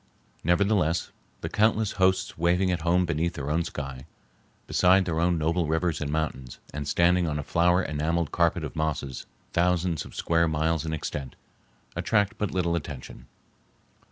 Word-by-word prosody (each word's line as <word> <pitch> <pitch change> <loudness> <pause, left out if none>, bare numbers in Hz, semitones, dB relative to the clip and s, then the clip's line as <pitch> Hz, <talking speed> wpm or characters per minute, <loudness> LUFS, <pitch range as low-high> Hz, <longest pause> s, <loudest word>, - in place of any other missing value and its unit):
Nevertheless, 90 -1 +2 0.3
the - - -3
countless 110 0 +2
hosts 95 0 +1
waving 90 +3 +2
at 85 -2 -1
home 90 +2 +2
beneath 85 +1 -1
their 70 +1 -3
own 85 +2 +1
sky, 70 -3 -6 0.6
beside 95 +1 +4
their 80 -2 -1
own 85 0 +2
noble 80 +1 0
rivers 80 +1 0
and 75 -1 -2
mountains, 70 -5 -3 0.2
and 75 0 -4
standing 85 +2 +3
on 75 -1 -1
a 75 - -3
flower 90 +4 +3
enameled 80 +2 -1
carpet 85 -1 +1
of 75 - -6
mosses 75 -4 -3 0.3
thousands 90 -1 +1
of - - -12
square 85 0 +2
miles 80 0 0
in - - -2
extent, 70 -3 -4 0.6
attract 105 -3 +1
but 105 - 0
little 85 -2 0
attention. 70 -6 -7
85 Hz, 155 wpm, -27 LUFS, 75-90 Hz, 0.6 s, beside